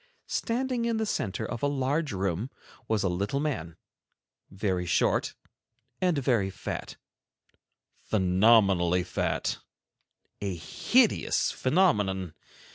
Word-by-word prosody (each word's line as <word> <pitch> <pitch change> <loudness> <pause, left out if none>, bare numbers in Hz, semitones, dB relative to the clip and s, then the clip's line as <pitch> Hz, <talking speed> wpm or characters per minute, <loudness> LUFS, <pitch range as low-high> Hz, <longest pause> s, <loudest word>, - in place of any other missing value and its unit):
Standing 245 0 -1
in 230 -1 0
the 220 - 0
center 100 - -2
of 120 - -5
a 145 - +2
large 145 +2 0
room, 95 +4 -2 0.4
was 110 -2 +1
a - - +2
little 100 +9 -1
man, 85 - -3 0.7
very 95 -2 -2
short, - - +1 0.7
and 180 -4 +2
very 120 -8 +1
fat, 95 - -6 1.0
phenomenally 95 -2 +3
fat, 90 - -2 0.8
a 100 -3 -2
hideous 80 - +2
phenomenon. 105 - +1
105 Hz, 105 wpm, -28 LUFS, 95-145 Hz, 1.0 s, phenomenally